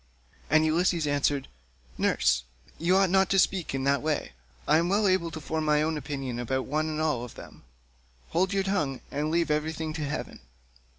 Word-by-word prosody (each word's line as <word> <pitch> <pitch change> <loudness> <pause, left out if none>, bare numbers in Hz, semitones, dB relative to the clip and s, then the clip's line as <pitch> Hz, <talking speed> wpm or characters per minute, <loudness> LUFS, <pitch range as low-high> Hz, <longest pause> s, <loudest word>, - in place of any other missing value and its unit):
And 155 +2 +4
Ulysses 165 0 +2
answered, 145 -1 0 0.5
"Nurse, 60 +1 +2 0.4
you 180 +3 +3
ought 195 -2 +3
not 190 0 +4
to 195 - +2
speak 185 -5 +1
in 135 - -2
that 140 +1 +2
way; 155 -1 -1 0.4
I 155 +2 +5
am 170 +1 0
well 205 +2 +3
able 185 -3 +2
to 160 -1 -7
form 160 +1 -3
my 150 0 +3
own 160 +1 0
opinion 135 -5 -4
about 130 +2 -1
one 155 +3 -1
and 155 0 -3
all 155 -6 0
of 120 - -9
them; - - -12 0.7
hold 185 +3 +1
your 195 -1 +1
tongue 155 -9 -1
and 150 +2 -1
leave 165 -1 +1
everything 155 +1 -1
to 155 -1 -4
heaven." 145 0 -4
155 Hz, 190 wpm, -27 LUFS, 145-170 Hz, 0.7 s, I